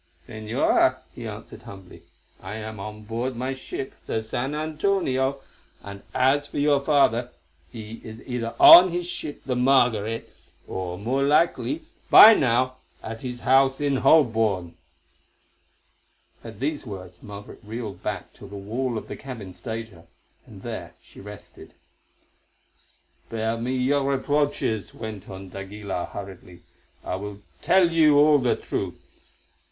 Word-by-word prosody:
"Señora," 110 0 +1 0.2
he - - -7
answered - - -9
humbly, 95 -2 -12 0.4
"I 95 +3 -7
am 110 -1 -7
on 105 +1 -8
board 120 +4 -3
my 130 +3 -3
ship, 130 0 -6
the 110 - -2
San 125 +6 -3
Antonio, 150 -4 0 0.4
and 100 0 -9
as 140 +3 +2
for - - -8
your 145 -1 +3
father, 130 -5 +2 0.4
he 110 +1 -9
is 110 0 -9
either 120 -2 -4
on 180 +2 +10
his 175 0 -3
ship, 160 -4 -6
the 130 - -1
Margaret, 120 -4 +2 0.3
or 90 -1 -4
more 125 +7 -1
likely, 170 - +1 0.3
by 225 - +11
now, 130 - +1 0.3
at 115 0 -7
his 125 -1 -6
house 135 +1 +3
in 140 -2 +1
Holborn." 110 - +3 1.7
At 115 -3 -10
these 145 +3 -2
words 95 -5 -9
Margaret 100 -1 -10
reeled 105 -3 -7
back 100 -4 -5
till 100 - -13
the 100 - -10
wall 115 +5 -3
of - - -7
the - - -6
cabin 115 -9 -9
stayed 110 +5 -6
her, 85 -4 -18 0.4
and - - -13
there - - -7
she - - -16
rested. 105 0 -12 1.0
"Spare 110 0 -6
me 125 +3 -2
your 135 +3 +1
reproaches," 140 -6 -1
went 110 -4 -8
on 95 0 -9
d'Aguilar 95 -1 -5
hurriedly. 90 -3 -10 0.4
"I 90 - -3
will 100 +1 -8 0.2
tell 180 -3 +4
you 155 -3 +5
all 150 0 +6
the 125 -2 +1
truth. - - -4
115 Hz, 140 wpm, -24 LUFS, 105-135 Hz, 1.7 s, by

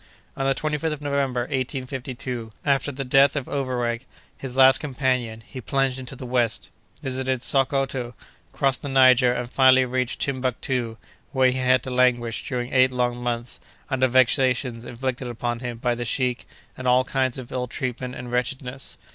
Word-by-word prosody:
On 135 - -1
the 135 - +2
25th 155 +1 -1
of 150 - -8
November, 140 -3 0
1852, 130 -2 -4
after 140 0 +1
the 135 0 -5
death 135 +2 +5
of 140 -3 -3
Overweg, 125 -3 -2 0.3
his 130 -1 -7
last 130 0 +7
companion, 130 -5 -1
he 130 - -8
plunged 135 +1 0
into 130 +1 -6
the 130 - -8
west, 120 -2 0 0.3
visited 130 -1 -1
Sockoto, 135 -3 +1 0.4
crossed 135 -2 +1
the 145 - -5
Niger, 130 -2 +6
and 125 0 -2
finally 130 0 +5
reached 125 -1 -2
Timbuctoo, 125 -3 -2 0.4
where 130 -1 +4
he 130 - -3
had 130 -1 +3
to 130 - -5
languish, 125 -2 +1
during 125 -1 -3
eight 130 0 +5
long 125 -1 0
months, 120 0 -3 0.3
under 130 -1 +3
vexations 125 -1 +2
inflicted 125 +1 -4
upon 120 0 -3
him 120 -1 -5
by 120 +1 0
the 120 0 -4
sheik, 125 +1 -1 0.3
and 130 - -5
all 125 +1 +5
kinds 130 -1 -1
of 130 -1 -8
ill 125 -1 -2
treatment 125 0 -4
and 125 0 -7
wretchedness. 125 +1 -3
130 Hz, 165 wpm, -24 LUFS, 125-135 Hz, 0.4 s, last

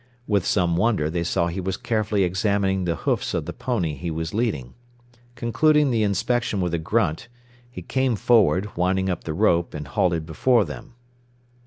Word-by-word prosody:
With 100 -4 0
some 85 -4 +1
wonder, 100 -7 +1
they 85 0 -1
saw 85 0 0
he 85 +2 -3
was 95 +1 -3
carefully 110 -3 0
examining 95 0 0
the 85 -1 0
hoofs - - 0
of - - -2
the - - -5
pony 100 - -2
he 75 +5 -5
was 80 +2 -4
leading. 100 - -2 0.6
Concluding 145 +4 +2
the 115 -2 +1
inspection 105 +1 0
with 90 -2 -1
a 85 - 0
grunt, 85 0 -1 0.4
he 125 - -9
came 130 -2 0
forward, 105 -3 +2
winding 95 +2 +1
up 90 - -5
the 80 - -3
rope, 85 -4 +2
and 75 -1 -6
halted 85 +1 0
before 110 +8 +2
them. 120 - -10
95 Hz, 175 wpm, -23 LUFS, 85-115 Hz, 0.6 s, Concluding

